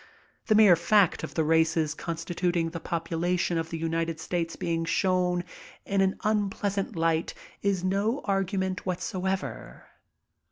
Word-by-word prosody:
The 215 Hz, -, +4 dB
mere 210 Hz, -4 st, +8 dB
fact 190 Hz, +2 st, +3 dB
of -, -, -6 dB
the 160 Hz, -, +2 dB
races 160 Hz, -1 st, +2 dB
constituting 170 Hz, +1 st, -2 dB
the 165 Hz, -, -5 dB
p<^ulation 170 Hz, +1 st, -1 dB
of 165 Hz, 0 st, -4 dB
the 165 Hz, -, -4 dB
United 165 Hz, 0 st, -2 dB
States 165 Hz, 0 st, -2 dB
being 165 Hz, -1 st, -1 dB
shown 180 Hz, 0 st, +1 dB, 0.4 s
in 195 Hz, -1 st, +1 dB
an 190 Hz, 0 st, +2 dB
unpleasant 205 Hz, -2 st, -1 dB
light 165 Hz, 0 st, 0 dB, 0.3 s
is 195 Hz, -3 st, 0 dB
no 200 Hz, +7 st, 0 dB
argument 190 Hz, -1 st, -1 dB
whatever. 185 Hz, +1 st, -3 dB
180 Hz, 130 wpm, -27 LUFS, 165-195 Hz, 0.4 s, mere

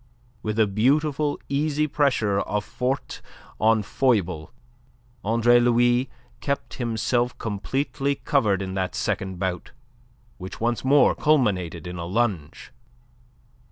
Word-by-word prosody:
With 110 Hz, 0 st, -3 dB
a 110 Hz, -, +5 dB
beautiful, 145 Hz, +8 st, +1 dB
easy 150 Hz, +1 st, 0 dB
pressure 130 Hz, -9 st, +1 dB
of 105 Hz, +1 st, -2 dB
forte 130 Hz, +3 st, -3 dB, 0.4 s
on 110 Hz, -1 st, +3 dB
foible 95 Hz, -, 0 dB, 0.7 s
Andre 115 Hz, +3 st, +4 dB
Louis 120 Hz, +1 st, +3 dB, 0.3 s
kept 140 Hz, +2 st, -3 dB
himself 120 Hz, +1 st, 0 dB
completely 135 Hz, +6 st, -2 dB
covered 105 Hz, -10 st, +1 dB
in 95 Hz, 0 st, -5 dB
that 95 Hz, -1 st, -2 dB
second 95 Hz, -1 st, -2 dB
bout, 90 Hz, -1 st, -3 dB, 0.7 s
which 95 Hz, 0 st, -8 dB
once 120 Hz, +1 st, -1 dB
more 140 Hz, +2 st, +5 dB
culminated 95 Hz, -, +1 dB
in 90 Hz, 0 st, -6 dB
a 85 Hz, -, -4 dB
lunge. 95 Hz, -5 st, -2 dB
115 Hz, 115 wpm, -24 LUFS, 95-135 Hz, 0.7 s, a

